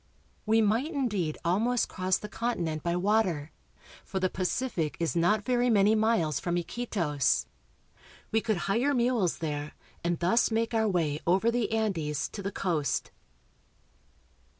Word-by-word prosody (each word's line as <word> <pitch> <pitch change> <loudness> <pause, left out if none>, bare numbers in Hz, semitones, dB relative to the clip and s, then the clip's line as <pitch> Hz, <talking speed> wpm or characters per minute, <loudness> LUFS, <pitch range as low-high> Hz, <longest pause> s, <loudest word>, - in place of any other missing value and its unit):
We 225 +1 +4
might 230 +9 +1
indeed 210 - -1
almost 225 +8 +2
cross 185 0 0
the 210 - -7
continent 175 -9 -2
by 170 +2 -1
water, 180 -6 +1 0.5
for 190 - -3
the 185 -1 0
Pacific 185 - -2
is 165 0 -1
not 205 +5 +2
very 245 -1 +2
many 210 -1 +4
miles 215 - +2
from 175 0 -1
Iquitos. 175 - 0 0.9
We 220 - +2
could 215 -3 0
hire 245 +8 +1
mules 235 -7 +1
there 150 -2 -4 0.3
and 170 0 0
thus 180 +8 +2
make 230 +1 0
our 220 -1 +2
way 160 -6 0
over 190 +6 +3
the 235 -2 -1
Andes 175 -10 -1
to 205 - -7
the 195 +1 -3
coast. 165 -8 -1
195 Hz, 145 wpm, -29 LUFS, 170-225 Hz, 0.9 s, We